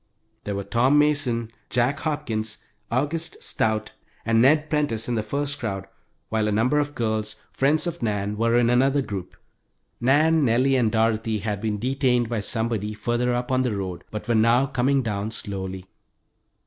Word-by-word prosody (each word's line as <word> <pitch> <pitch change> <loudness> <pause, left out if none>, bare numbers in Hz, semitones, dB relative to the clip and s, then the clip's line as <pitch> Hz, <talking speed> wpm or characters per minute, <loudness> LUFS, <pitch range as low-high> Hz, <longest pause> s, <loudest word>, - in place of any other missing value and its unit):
There 100 - -2
were 100 - -3
Tom 120 +8 +3
Mason, 140 -6 +1 0.2
Jack 125 +4 +1
Hopkins, 115 -9 -2 0.3
August 150 +7 -1
Stout, 110 0 0 0.3
and 115 0 +3
Ned 150 +4 +4
Prentice 145 -8 0
in 120 - -1
the 115 - 0
first 140 +6 -2
crowd, 100 -6 -3 0.4
while 110 -1 0
a - - +1
number 125 +8 +2
of 145 0 -2
girls, 110 -2 -1 0.2
friends 150 +3 +2
of 170 -3 -4
Nan's, 105 -2 -1
were 115 +2 +2
in 120 0 +3
another 135 +3 +3
group. 95 -6 -6 0.6
Nan, 155 +5 +3
Nellie, 130 +2 +3
and 120 -4 +2
Dorothy 110 0 +1
had 105 -1 -3
been 110 -1 -1
detained 125 0 +1
by 115 -2 -1
somebody 110 -1 -2
further 120 +2 0
up 125 +1 -3
on 130 0 +3
the 125 -5 0
road, 95 -3 -5
but 105 0 -6
were 120 - +2
now 115 +4 +4
coming 135 0 +1
down, 105 -2 -2
slowly. 95 -3 -5
115 Hz, 170 wpm, -24 LUFS, 110-135 Hz, 0.6 s, Ned